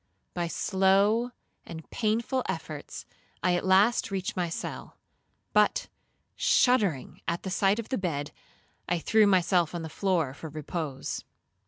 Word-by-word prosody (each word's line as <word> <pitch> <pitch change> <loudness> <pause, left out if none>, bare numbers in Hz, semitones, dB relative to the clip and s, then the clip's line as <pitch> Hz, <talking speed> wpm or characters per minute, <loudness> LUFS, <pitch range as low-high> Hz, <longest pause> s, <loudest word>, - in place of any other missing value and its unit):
By 175 -1 -1
slow 195 +6 +2 0.3
and 160 -1 -9
painful 235 +4 0
efforts, - - -5 0.4
I 180 - +3
at 175 - -1
last 195 +6 +4
reached 190 -2 -3
my 175 -2 -1
cell; 165 - -6 0.6
but, - - +3 0.5
shuddering 205 - +2
at 170 0 -1
the 190 - -4
sight 195 +2 +2
of 230 - -5
the 260 - -1
bed, 150 -6 -2 0.6
I 175 - +2
threw 215 +5 +4
myself 180 -3 +3
on 170 - -4
the 160 - -5
floor 170 -7 0
for 160 +3 -8
repose. 150 -2 -4
185 Hz, 140 wpm, -28 LUFS, 165-205 Hz, 0.6 s, last